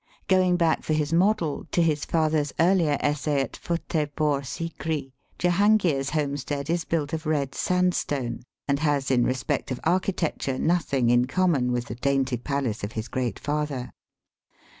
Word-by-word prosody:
Going 185 Hz, -2 st, +4 dB
back 165 Hz, -2 st, +2 dB
for 155 Hz, -, -1 dB
his 155 Hz, 0 st, 0 dB
model 175 Hz, -4 st, +1 dB
to 175 Hz, -, +4 dB
his 150 Hz, -3 st, +1 dB
father's 155 Hz, -3 st, +1 dB
earlier 165 Hz, -4 st, +3 dB
essay 145 Hz, 0 st, 0 dB
at 135 Hz, -, -4 dB
Futtehpore 150 Hz, -4 st, -1 dB
Sikri, 155 Hz, -1 st, -4 dB, 0.3 s
Jehangir's 175 Hz, -6 st, +3 dB
homestead 145 Hz, 0 st, -2 dB
is 170 Hz, -1 st, 0 dB
built 150 Hz, -3 st, -1 dB
of 160 Hz, 0 st, -3 dB
red 145 Hz, -4 st, 0 dB
sand 180 Hz, 0 st, +1 dB
stone, 125 Hz, -8 st, -2 dB, 0.3 s
and 140 Hz, -1 st, +1 dB
has 145 Hz, -3 st, +1 dB
in 125 Hz, -2 st, +4 dB
respect 130 Hz, +1 st, -1 dB
of 130 Hz, -, -3 dB
architecture 170 Hz, -6 st, 0 dB
nothing 140 Hz, -8 st, +1 dB
in 120 Hz, 0 st, +4 dB
common 140 Hz, -5 st, +1 dB
with 120 Hz, -1 st, -1 dB
the 110 Hz, -, -6 dB
dainty 135 Hz, +1 st, 0 dB
palace 125 Hz, -4 st, -2 dB
of 105 Hz, +2 st, -4 dB
his 110 Hz, +1 st, -4 dB
great 125 Hz, -5 st, -2 dB
father. 145 Hz, -4 st, -3 dB
150 Hz, 155 wpm, -25 LUFS, 135-165 Hz, 0.3 s, Going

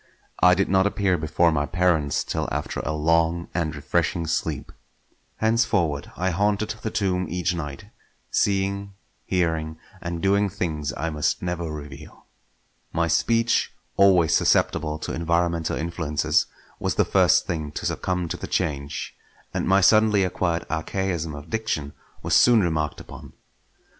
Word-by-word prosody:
I 90 Hz, 0 st, +7 dB
did 95 Hz, -, +1 dB
not 95 Hz, +1 st, +3 dB
appear 100 Hz, -3 st, +1 dB
before 80 Hz, +1 st, +2 dB
my 75 Hz, -2 st, 0 dB
parents 85 Hz, -5 st, +1 dB
till -, -, -3 dB
after -, -, -3 dB
a 70 Hz, -, -2 dB
long 80 Hz, +2 st, +1 dB
and 80 Hz, -3 st, -1 dB
refreshing 80 Hz, +3 st, -1 dB
sleep. 80 Hz, +1 st, -2 dB, 0.7 s
Henceforward 105 Hz, -10 st, +1 dB
I 95 Hz, +1 st, 0 dB
haunted 105 Hz, +4 st, 0 dB
the 110 Hz, -, -2 dB
tomb 95 Hz, -4 st, 0 dB
each 90 Hz, 0 st, -1 dB
night; 75 Hz, -5 st, -6 dB, 0.5 s
seeing, 100 Hz, 0 st, 0 dB, 0.3 s
hearing, 80 Hz, -3 st, -1 dB, 0.2 s
and 85 Hz, -1 st, -4 dB
doing 100 Hz, +3 st, +2 dB
things 80 Hz, -7 st, -3 dB
I 80 Hz, +3 st, -2 dB
must 75 Hz, +2 st, -1 dB
never 85 Hz, -2 st, -3 dB
reveal. 75 Hz, 0 st, -10 dB, 0.7 s
My 85 Hz, +1 st, 0 dB
speech, 115 Hz, +6 st, +2 dB, 0.2 s
always 95 Hz, -5 st, +5 dB
susceptible 75 Hz, 0 st, +2 dB
to -, -, -5 dB
environmental 85 Hz, 0 st, 0 dB
influences, 80 Hz, -3 st, 0 dB, 0.3 s
was -, -, -1 dB
the -, -, +3 dB
first -, -, +4 dB
thing 80 Hz, -3 st, -3 dB
to -, -, -5 dB
succumb 90 Hz, -2 st, -1 dB
to -, -, -3 dB
the -, -, -6 dB
change; 70 Hz, -6 st, -3 dB, 0.4 s
and -, -, -1 dB
my 95 Hz, +1 st, +4 dB
suddenly 110 Hz, 0 st, +5 dB
acquired 85 Hz, -2 st, -1 dB
archaism 85 Hz, -1 st, -2 dB
of 70 Hz, 0 st, -10 dB
diction 110 Hz, -11 st, -2 dB, 0.3 s
was -, -, -1 dB
soon 120 Hz, -3 st, +6 dB
remarked 80 Hz, -3 st, -1 dB
upon. -, -, -11 dB
85 Hz, 145 wpm, -24 LUFS, 80-95 Hz, 0.7 s, I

